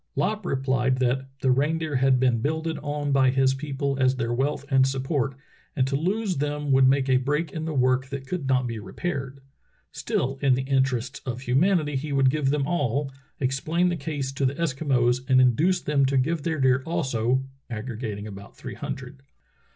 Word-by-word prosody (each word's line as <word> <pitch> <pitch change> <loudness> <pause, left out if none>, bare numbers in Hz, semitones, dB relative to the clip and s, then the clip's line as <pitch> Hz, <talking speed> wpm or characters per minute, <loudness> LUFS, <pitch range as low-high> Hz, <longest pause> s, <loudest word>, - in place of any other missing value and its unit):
Lopp 215 +2 -1
replied 130 -1 +1
that 130 +1 0
"the 130 - +3
reindeer 150 +2 +1
had 130 0 +3
been 125 -3 +2
builded 160 +4 -2
on 145 -1 -3
by 135 -1 +4
his 135 0 +3
people 140 0 -3
as 130 0 +3
their 115 -1 -2
wealth 140 +3 -1
and 130 0 +5
sup 135 -1 -2
port, 135 -2 -1 0.4
and 130 - +2
to 135 +1 -1
lose 190 +5 -1
them 145 0 -2
would 130 -1 +6
make 135 0 +3
a 130 -1 +4
break 150 +5 -1
in 160 -1 -4
the 160 - -3
work 130 0 +2
that 135 0 -6
could 150 -1 -4
not 130 -1 +2
be 115 -2 -4
repaired. 135 +2 -5 0.5
Still, 135 +1 -2
in 135 -3 +4
the 130 - -2
interests 130 -1 0
of 125 -1 -4
humanity 150 +4 +2
he 145 +3 -3
would 135 -1 +4
give 145 -2 0
them 140 -1 +1
all, 145 -3 -1 0.3
explain 155 +7 +1
the 175 - -1
case 140 -3 -4
to 135 0 0
ti^.e 135 - -3
Eskimos, 130 -6 +1
and 130 -1 +6
induce 155 +9 +3
them 140 -2 +2
to 135 0 +1
give 155 +5 +1
their 160 +1 -1
deer 130 0 +3
also 130 -6 0 0.3
[aggregating 110 -2 -5
about 100 -1 -10
three - - -7
hundred]." 130 +1 -7
135 Hz, 190 wpm, -25 LUFS, 130-150 Hz, 0.5 s, would